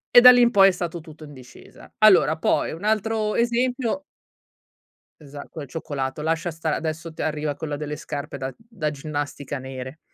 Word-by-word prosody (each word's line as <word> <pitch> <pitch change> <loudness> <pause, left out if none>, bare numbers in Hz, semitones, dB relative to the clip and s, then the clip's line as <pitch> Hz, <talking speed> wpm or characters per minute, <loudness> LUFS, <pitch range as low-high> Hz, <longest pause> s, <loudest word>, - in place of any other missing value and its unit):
e 245 - +11
da 250 +1 +11
lì 245 0 +5
in 240 - +6
poi, 195 -4 +7
è - - +2
stato 175 -2 -4
tutto 155 0 -13
in 145 -1 -11
discesa. 125 -2 -15
Allora, 185 -7 +6
poi, - - +1
un 165 +4 -8
altro 215 0 0
esempio 245 +3 0 1.2
Esa 145 -1 -10
quel 155 -4 -7
cioccolato. 140 -3 -4
Lascia 165 +2 -1
stare, 160 -1 -2
adesso 165 +1 -4
t 160 - -20
arriva 150 -1 -1
quella 150 0 -4
delle 150 0 -5
scarpe 145 0 -6
da 135 0 -5
da 225 -9 -4
ginnastica, 145 -1 -5
nere. 130 +2 -8
160 Hz, 180 wpm, -23 LUFS, 145-210 Hz, 1.2 s, e